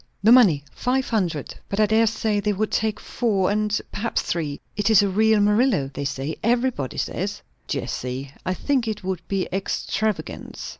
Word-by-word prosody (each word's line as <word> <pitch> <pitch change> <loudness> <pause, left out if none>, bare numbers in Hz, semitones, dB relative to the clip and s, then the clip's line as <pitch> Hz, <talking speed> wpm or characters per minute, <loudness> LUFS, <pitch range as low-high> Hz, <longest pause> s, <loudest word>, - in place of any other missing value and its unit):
"The 220 - +6
money. 195 - +6
Five 260 +1 0
hundred. 175 - -1 0.2
But 200 - -2
I 215 - +6
dare 220 +2 +3
say 215 -1 0
they 210 0 0
would 215 +2 -1
take 220 -1 0
four, 200 -6 0
and 210 0 +1
perhaps 230 +3 -1
three. 150 -4 -2 0.2
It 205 +1 +1
is 215 -2 +6
a - - +2
real 220 +2 +3
Murillo, 210 - +2
they 140 +1 -4
say. 140 +3 -3
Everybody 235 - 0
says." - - -3 0.2
"Jessie, 130 +2 -4
I 185 - -1
think 260 +2 0
it 210 -2 -3
would 185 -2 -2
be 195 -1 -1
extravagance." 195 +2 -3
210 Hz, 170 wpm, -23 LUFS, 180-220 Hz, 0.2 s, The